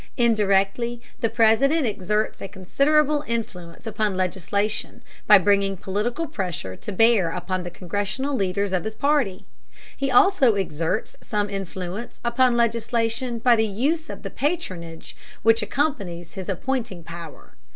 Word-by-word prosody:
Indirectly 225 0 +2 0.2
the 230 - +1
President 270 +8 +3
exerts 210 0 -1
a - - -4
considerable 290 - +1
influence 190 -6 -5
upon 215 -3 -1
legislation 190 +3 -2 0.2
by 210 - +9
bringing 200 0 +2
political 215 - -2
pressure 180 - -4
to 210 - -7
bear 215 -3 +4
upon 185 +2 -3
the 175 - -5
Congressional 205 +10 -3
leaders 195 -1 -1
of 180 -3 0
his 220 0 -5
party. 225 -8 +1 0.5
He 275 0 -1
also 265 - +5
exerts 170 0 -2
some 205 -2 -2
influence 195 +2 -5
upon 240 0 +3
legislation 235 +1 0
by 240 +1 +4
the 220 -1 +2
use 285 +11 -1
of - - -8
the - - -5
patronage 185 - -4 0.3
which 225 +1 +4
accompanies 200 - -2
his 190 0 -7
appointing 230 -4 -3
power. 165 - -10
210 Hz, 135 wpm, -24 LUFS, 190-240 Hz, 0.5 s, by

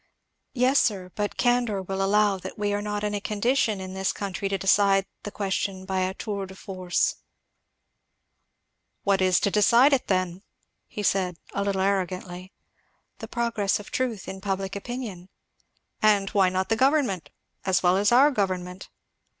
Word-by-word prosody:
"Yes, 255 +2 +4
sir, 190 -5 0
but 205 -1 -3
candour 245 -4 +1
will 195 +1 -3
allow 205 0 +3
that 190 +1 -8
we 205 -1 -1
are 205 - -1
not 210 0 -3
in 210 0 -1
a 205 - -2
condition 215 0 0
in 185 0 -7
this 190 0 -1
country 195 -1 -4
to 195 - 0
decide 195 0 +3 0.2
the - - -6
question 195 -1 -3
by 190 0 -1
a 185 +1 -1
tour 200 -3 -4
de 190 - -12
force." 185 -2 -1 1.9
"What 195 -1 +2
is 185 -1 +4
to 200 - +1
decide 235 +7 +5
it 265 - +1
then?" 185 -1 -1 0.6
said 185 -3 +1
he - - -4
a - - +1
little 200 -1 -1
arrogantly. 185 -1 -2 0.7
"The - - -7
progress 230 -5 0
of 210 - -11
truth 240 -7 -2
in 190 0 -7
public 195 -1 -3
opinion." 200 -5 -6 0.7
"And 205 -2 +3
why 195 -3 +4
not 185 +1 -2
the 225 - +3
government 260 - +1 0.3
as 190 -1 +1
well 180 0 +4
as 205 +3 +2
our 270 +5 +6
government?" 185 -5 -3
195 Hz, 165 wpm, -25 LUFS, 190-210 Hz, 1.9 s, our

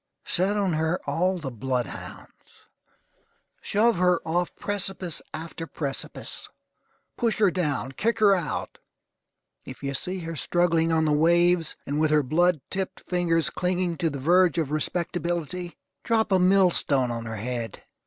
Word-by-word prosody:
Set 195 +4 +1
on 195 -4 +1
her 160 +2 0
all 180 +6 +1
the 145 -6 -5
blood 125 +1 -1
hounds. - - -12 1.0
Shove 220 0 +2
her 180 -1 +3
off 175 +2 -1
precipice 195 -4 -1
after 165 +1 -6
precipice. 140 -4 -5 0.7
Push 230 -2 0
her 205 -4 +4
down. 145 - -1
Kick 225 - 0
her 210 -2 +5
out! 175 -6 -3 0.8
If 130 +1 -10
you 140 0 -2
see 180 +7 -2
her 165 0 -5
struggling 165 +1 +1
on 160 -1 +2
the 150 - +2
waves, 170 +2 +3
and 145 +2 -2
with 155 0 +3
her 150 -1 +3
blood 165 +3 +2
tipped 190 -1 -3
fingers 165 -4 0
clinging 180 -1 -1
to 165 - 0
the 140 - -5
verge 175 +5 +3
of 155 -4 -1
respectability, 175 +2 -2 0.3
drop 225 -3 +1
a 190 - +4
mill 185 0 +5
stone 130 -7 +2
on 115 -1 -4
her 110 - -4
head. 115 0 -5
170 Hz, 155 wpm, -26 LUFS, 150-180 Hz, 1.0 s, her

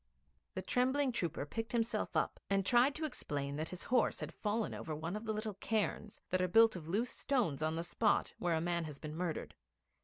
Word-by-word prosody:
The 185 - -3
trembling 260 +6 +2
trooper 170 -10 -1
picked 225 +8 -4
himself 230 -1 0
up, - - 0
and 195 -1 +2
tried 245 +6 +5
to 315 - -2
explain 140 - -3
that 155 +1 -2
his 180 - -6
horse 245 -2 +2
had - - -5
fallen 215 +1 -1
over 155 - -4
one 165 +5 -3
of 215 +2 -5
the 220 - 0
little 215 0 -2
cairns 210 +1 -2
that 185 0 +2
are 185 - +2
built 225 +4 +6
of 165 -4 -7
loose 215 +8 0
stones 225 - 0
on 155 +1 +1
the 165 - -2
spot 210 +4 +1
where 175 -2 +1
a 160 - 0
man 170 0 0
has 150 -3 -7
been 155 +1 -6
murdered. 170 -1 -3
195 Hz, 215 wpm, -35 LUFS, 165-230 Hz, -, built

